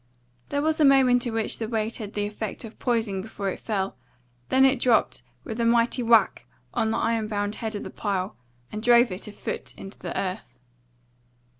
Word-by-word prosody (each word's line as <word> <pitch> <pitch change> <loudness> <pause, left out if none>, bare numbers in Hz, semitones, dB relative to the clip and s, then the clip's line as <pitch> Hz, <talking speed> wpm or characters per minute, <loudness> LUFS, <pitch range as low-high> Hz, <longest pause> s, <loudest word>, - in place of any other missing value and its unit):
There 285 0 0
was 315 0 +1
a - - +5
moment 260 -3 +5
in 235 - -3
which 225 -1 -1
the 225 - -2
weight 220 -1 -1
had 210 -3 -7
the 205 0 0
effect 210 +1 -5
of 220 - -12
poising 225 -6 0
before 200 -1 -4
it - - -7
fell; 195 - -2 0.5
then 265 +1 +5
it 265 -1 +3
dropped 240 -3 +2 0.2
with 225 -1 -6
a - - +2
mighty 235 +2 +3
whack 230 -4 +3 0.3
on 220 - +1
the 225 - 0
iron 230 -2 0
bound 205 -1 -2
head 220 -2 -4
of 205 - -4
the - - -7
pile, 195 -1 -2 0.4
and 215 - -5
drove 240 -1 +5
it 185 +3 -4
a - - -7
foot - - -6
into 195 +1 -10
the - - -4
earth. 185 - -5
225 Hz, 200 wpm, -25 LUFS, 205-240 Hz, 0.5 s, a